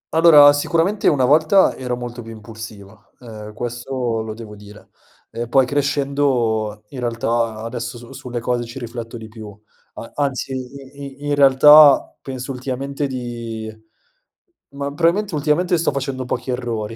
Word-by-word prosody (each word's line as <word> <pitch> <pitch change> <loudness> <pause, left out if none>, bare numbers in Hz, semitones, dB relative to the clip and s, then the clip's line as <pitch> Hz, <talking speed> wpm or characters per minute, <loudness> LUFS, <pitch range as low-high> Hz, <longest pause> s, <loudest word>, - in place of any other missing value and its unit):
Allora, 150 -3 +8
sicuramente 170 +7 0
una 135 -5 +3
volta 155 +8 +4
ero 125 -1 -3
molto 120 0 -7
più 115 0 -10
impulsivo, 110 -1 -12
ehm, 110 -3 -10
questo 120 0 -3
lo 110 -1 -6
devo 110 -2 -10
dire, 105 0 -15 0.4
ehm, 120 0 -5
poi 135 +1 +4
crescendo 135 -6 0
in 135 - -8
realtà 115 -2 -1
adesso 115 0 -5
su 120 0 -13
sulle 125 -1 -6
cose 120 +1 -1
ci 120 +2 -10
rifletto, 120 -1 -7
di 110 - -9
più 110 -2 -11 0.4
a 115 - -9
anzi, 135 -3 -2
i 135 +2 -9
i - - -6
in - - +1
realtà 145 +1 +7
penso 130 0 -6
ultimamente 135 +2 -4
di 115 -4 -6 1.0
ma 140 0 -4
probabilmente 175 +5 +1
ultimamente 160 +5 +1
sto 165 - +1
facendo 135 -2 -4
pochi 125 - -3
errori, 115 -3 -4
125 Hz, 150 wpm, -20 LUFS, 115-140 Hz, 1.0 s, Allora